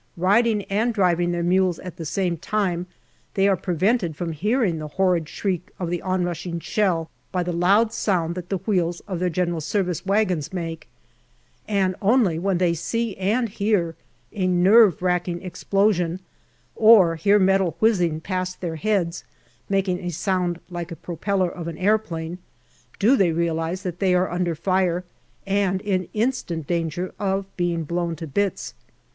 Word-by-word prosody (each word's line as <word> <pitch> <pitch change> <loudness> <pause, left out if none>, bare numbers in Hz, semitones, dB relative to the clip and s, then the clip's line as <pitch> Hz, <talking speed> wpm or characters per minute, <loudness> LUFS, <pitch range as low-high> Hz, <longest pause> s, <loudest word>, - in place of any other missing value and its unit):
Riding 210 +4 +3
and 220 +4 0
driving 175 -3 +2
their 175 0 -1
mules 180 -1 +2
at 180 -2 -9
the 165 - -6
same 180 +2 -1
time, 180 0 -1 0.5
they 195 0 +3
are 195 - +4
prevented 180 0 0
from 170 +1 -3
hearing 200 - 0
the 155 - -5
horrid 175 -1 +1
shriek 185 -1 -3
of 175 -2 -3
the 175 - -2
on 185 -1 0
rushing 170 0 -3
shell 170 -4 0 0.2
by 180 -1 0
the 175 0 -3
loud 200 +6 +3
sound 180 -7 0
that 180 0 -7
the 195 - 0
wheels 175 -4 -1
of 185 -4 -5
their 180 0 +1
G.S. 175 +1 -1
wagons 195 -6 0
make, 165 -3 -5 0.8
and 195 -3 +1
only 205 -6 +3
when 190 0 0
they 175 -1 +2
see 225 +6 -2
and 215 +6 +1
hear 200 -5 0 0.4
a 185 -3 0
nerve 185 +1 +5
racking 180 -1 0
explo 195 +3 +1
sion, 175 0 -2 0.6
or 215 -7 +6
hear 200 +6 +3
metal 190 -4 +2
whizzing 180 -8 +2
past 185 +1 -3
their 165 -3 -4
heads, 185 -3 -1 0.5
making 195 -2 +1
a 180 -2 -4
sound 175 0 -1
like 175 0 -5
a - - -5
propeller 180 +3 -1
of 170 -2 -7
an 165 -2 -5
aeroplane, 180 -4 -1 0.6
do 235 +7 +4
they 190 -9 +3
realize 165 +2 -1
that 175 -2 -4
they 185 -2 +3
are 180 +1 +1
under 175 -1 -1
fire 185 +1 0 0.4
and 195 -1 +1
in 190 -4 -1
instant 210 - -1
danger 170 +2 -2
of 195 -1 0
being 175 -2 -1
blown 170 +1 -2
to 165 - -7
bits. 195 +6 -2
180 Hz, 165 wpm, -23 LUFS, 170-195 Hz, 0.8 s, or